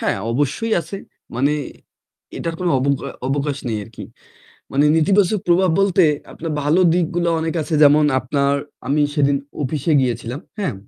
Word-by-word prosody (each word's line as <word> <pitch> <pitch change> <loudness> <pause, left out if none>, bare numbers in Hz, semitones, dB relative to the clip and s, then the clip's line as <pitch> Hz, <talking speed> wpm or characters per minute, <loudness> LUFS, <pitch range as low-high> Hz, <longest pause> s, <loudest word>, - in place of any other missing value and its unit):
হ্যাঁ - - 0 0.2
অবশ্যই 145 - -1
আছে। 170 +5 -7 0.4
মানে 135 +4 +1 0.9
এটার 165 0 -3
কোনো 180 - 0
অবগ 140 +1 +1 0.3
অবকাশ 140 0 -1
নেই 110 -2 -2
আরকি। 110 +1 -10 0.7
মানে 140 +2 +3
নেতিবাচক 195 +4 +2
প্রভাব 180 +1 +4
বলতে 190 -2 +3 0.3
আপনার 165 0 -6
ভালো 150 +6 +2
দিকগুলো 175 0 0
অনেক 160 +1 -2
আছে 155 +1 -3
যেমন 150 +1 +5 0.2
আপনার 140 +2 0 0.3
আমি 150 +2 +2
সেদিন 140 -2 +2 0.3
অফিসে 145 +3 -1
গিয়েছিলাম। 120 +1 -3 0.2
হ্যাঁ? 195 - -2
150 Hz, 145 wpm, -20 LUFS, 140-175 Hz, 0.9 s, যেমন